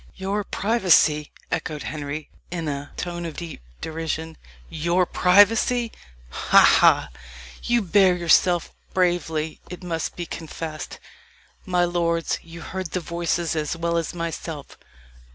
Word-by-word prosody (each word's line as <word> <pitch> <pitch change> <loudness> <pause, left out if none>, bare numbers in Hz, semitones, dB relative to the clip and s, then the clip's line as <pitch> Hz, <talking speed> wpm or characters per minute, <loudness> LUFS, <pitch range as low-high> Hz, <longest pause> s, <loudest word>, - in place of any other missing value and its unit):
"Your 195 +2 -2
privacy!" 180 -9 +3 0.2
echoed 150 -2 -3
Henry, 150 0 -5 0.2
in 165 -2 -4
a 145 -1 -4
tone 175 -1 -4
of 165 -2 -6
deep 170 - -7 0.2
derision 160 0 -4 0.3
"Your 170 +3 +1
privacy! 220 +7 +4 0.4
ha! - - +2 0.2
ha! - - +5 0.5
You 240 -2 +1
bear 190 0 +4
yourself 175 0 +3 0.2
bravely, 165 -4 0
it 180 +1 -8
must 165 -2 -3
be 175 - -4
confessed. 160 -1 -6 0.7
My 180 -1 +3
lords, 170 -1 0
you 165 +1 -11
heard 190 0 -4
the 185 - +1
voices 170 -1 -1
as 155 +1 -2
well 170 0 -1
as 165 -1 -1
myself. 165 -3 -5
170 Hz, 125 wpm, -24 LUFS, 160-180 Hz, 0.7 s, ha